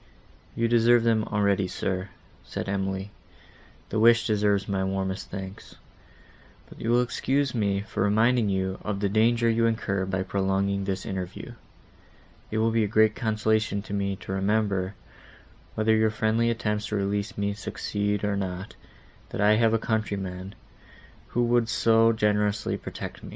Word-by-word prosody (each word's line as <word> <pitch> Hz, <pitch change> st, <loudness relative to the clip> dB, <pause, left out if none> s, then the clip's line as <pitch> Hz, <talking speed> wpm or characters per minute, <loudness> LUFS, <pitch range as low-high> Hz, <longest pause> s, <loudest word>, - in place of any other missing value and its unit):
"You 115 Hz, -, +1 dB
deserve 120 Hz, 0 st, +4 dB
them 110 Hz, -2 st, +2 dB
already, 100 Hz, -2 st, +1 dB
sir," 95 Hz, +1 st, -3 dB, 0.3 s
said -, -, -5 dB
Emily; 95 Hz, 0 st, -2 dB, 0.8 s
"the 110 Hz, -, -1 dB
wish 115 Hz, +1 st, +5 dB
deserves 105 Hz, -2 st, +1 dB
my 95 Hz, -1 st, -1 dB
warmest 95 Hz, 0 st, -3 dB
thanks. 95 Hz, 0 st, -8 dB, 0.9 s
But -, -, -13 dB
you 115 Hz, -, -2 dB
will 120 Hz, +1 st, +4 dB
excuse 135 Hz, +2 st, 0 dB
me 100 Hz, -4 st, 0 dB
for 105 Hz, -, -5 dB
reminding 110 Hz, +3 st, +3 dB
you 95 Hz, -1 st, -1 dB
of 105 Hz, -2 st, -3 dB
the 100 Hz, -1 st, 0 dB
danger 115 Hz, +3 st, +3 dB
you 115 Hz, 0 st, +3 dB
incur 100 Hz, -4 st, -1 dB
by 95 Hz, 0 st, -1 dB
prolonging 95 Hz, +1 st, 0 dB
this 95 Hz, -1 st, -3 dB
interview. 95 Hz, -1 st, -5 dB, 1.0 s
It 110 Hz, -, -3 dB
will 115 Hz, +1 st, +2 dB
be 115 Hz, 0 st, +2 dB
a -, -, 0 dB
great 110 Hz, +1 st, +4 dB
consolation 110 Hz, -2 st, 0 dB
to 100 Hz, -, -8 dB
me 100 Hz, -1 st, -1 dB
to -, -, -7 dB
remember, 100 Hz, -1 st, 0 dB, 0.8 s
whether 110 Hz, +1 st, +3 dB
your 110 Hz, 0 st, +3 dB
friendly 110 Hz, +2 st, +1 dB
attempts 105 Hz, -3 st, -1 dB
to 105 Hz, -, -3 dB
release 100 Hz, +2 st, -2 dB
me 100 Hz, 0 st, 0 dB
succeed 105 Hz, 0 st, -3 dB
or 105 Hz, -1 st, 0 dB
not, 95 Hz, 0 st, -4 dB, 0.6 s
that -, -, -6 dB
I 105 Hz, +1 st, +5 dB
have 115 Hz, 0 st, +3 dB
a -, -, +4 dB
countryman, 100 Hz, -4 st, -3 dB, 0.7 s
who 120 Hz, -, 0 dB
would 120 Hz, -1 st, +2 dB
so 115 Hz, 0 st, +4 dB
generously 105 Hz, -1 st, +1 dB
protect -, -, -7 dB
me." -, -, -9 dB
105 Hz, 155 wpm, -26 LUFS, 100-110 Hz, 1.0 s, wish